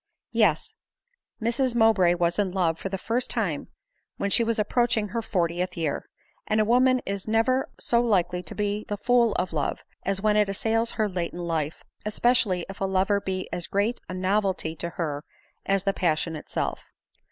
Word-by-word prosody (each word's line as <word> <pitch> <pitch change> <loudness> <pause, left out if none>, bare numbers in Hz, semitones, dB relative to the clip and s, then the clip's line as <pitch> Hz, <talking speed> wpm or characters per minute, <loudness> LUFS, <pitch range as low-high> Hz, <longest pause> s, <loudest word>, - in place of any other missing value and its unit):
Yes; 215 - +2 0.7
Mrs 240 +2 0
Mowbray 215 -7 +5
was 175 +2 0
in 195 -3 +1
love 170 -3 +1
for 195 - -4
the 195 - -2
first 230 +6 -1
time - - -1 0.5
when 200 - -1
she 235 - +4
was 230 0 0
approaching 220 0 +1
her 230 +2 -2
fortieth 180 -3 -1
year! 160 -4 -2 0.4
and 215 0 +2
a 215 - +4
woman 255 +2 +4
is 195 0 -3
never 225 +4 +2
so 235 0 +3
likely 180 -6 +1
to 160 - -9
be 205 0 -1
the 205 - -3
fool 240 +1 +3
of 180 -2 -2
love, 150 -3 -1 0.2
as 195 0 0
when 210 +1 +2
it 210 -1 +3
assails 225 +3 0
her 215 -2 +1
late 180 -3 -3
in 175 0 -5
life, 160 -2 -2 0.2
especial 240 +2 +2
ly 180 -1 -3
if 195 0 -10
a - - +2
lover 195 +1 +2
be 190 -1 -3
as 175 0 -3
great 205 +5 0
a 185 - -4
novelty 185 -3 0
to 170 - -3
her 150 -4 -3 0.4
as 195 -1 +2
the 195 -1 +1
passion 165 -2 0
itself. 155 - -3
195 Hz, 185 wpm, -26 LUFS, 180-225 Hz, 0.7 s, Mowbray